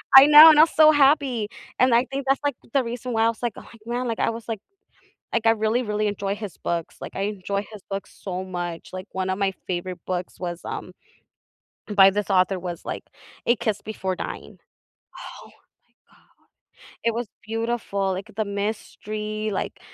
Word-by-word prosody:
I 270 - +12
know, 300 +2 +11
and 305 -1 +6
I - - +10
was 325 - 0
so 310 0 +8
happy, 275 -6 +3 0.3
and 255 -1 +4
I 240 +2 +4
think 275 0 -3
that's, 270 0 +2
like, 285 -2 0 0.2
the 275 - +3
reason 245 +1 -5
why 225 0 +2
I 230 - +4
was 230 +1 -6
like, 235 -3 0
“Oh - - -12 0.2
man,” 245 +1 -2
like, 230 - -3
I - - +2
was, 230 0 -8
like 225 -4 -4 0.7
like 225 - 0
I - - +7
really, 225 +2 +1
really 210 -1 -1
enjoy 200 -1 -2
his 205 -6 -7
books. 170 -1 -3
Like, - - -8
I 195 - -2
enjoy 200 0 -2
his 210 -3 -10
books 195 0 -6
so 185 -1 -4
much, 175 -2 -5
like, 185 +1 -6
1 190 0 -2
of 190 - -2
my 195 -1 +1
favorite 180 0 -3
books 180 -1 -4
was, 175 -1 -4
um, - - -6 1.0
by 195 -1 +8
this 205 0 -2
author 185 0 +2
was, 175 -1 -6
like, - - -5 0.4
A 235 - +5
Kiss 215 -2 -2
Before 190 -4 -3
Dying, - - -7 0.9
Oh - - -14
my - - -20 0.6
god, - - -29 0.6
it 230 - +2
was 235 0 -2 0.2
beautiful, 225 -4 -1
like 195 +4 -6
the 220 - 0
mystery, 215 +1 -4
like 190 - -4
215 Hz, 195 wpm, -24 LUFS, 190-235 Hz, 1.0 s, I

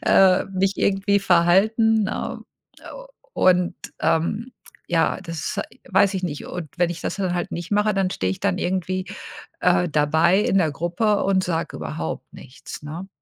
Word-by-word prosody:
äh 190 -1 +5
mich 195 0 0
irgendwie 200 +1 +2
verhalten, 200 +5 +3
ne, - - -4 0.4
äh, - - -19 0.5
und, 180 -1 +3 0.2
ähm, 205 +9 0 0.4
ja, 170 +2 +1
das 165 +2 -4 0.3
weiß 195 0 +3
ich 190 -1 -2
nicht. 150 -5 -5
Und, 165 -6 -6
wenn 175 -1 +2
ich 170 - -6
das - - -3
dann 185 -3 -1
halt 175 - -3
nicht 170 +3 -5
mache, 210 0 +2
dann 195 -1 +1
stehe 95 - -1
ich - - -8
dann 95 - 0
irgendwie, 185 0 -2 0.6
äh, 180 -1 +3
dabei 160 +5 +3
in 195 -2 +2
der 160 -4 +1
Gruppe 180 +7 0
und 190 -1 +2
sage 165 -2 -2
überhaupt 80 +1 -5
nichts, 130 - -11
ne? 165 +6 -7
180 Hz, 165 wpm, -23 LUFS, 165-195 Hz, 0.6 s, äh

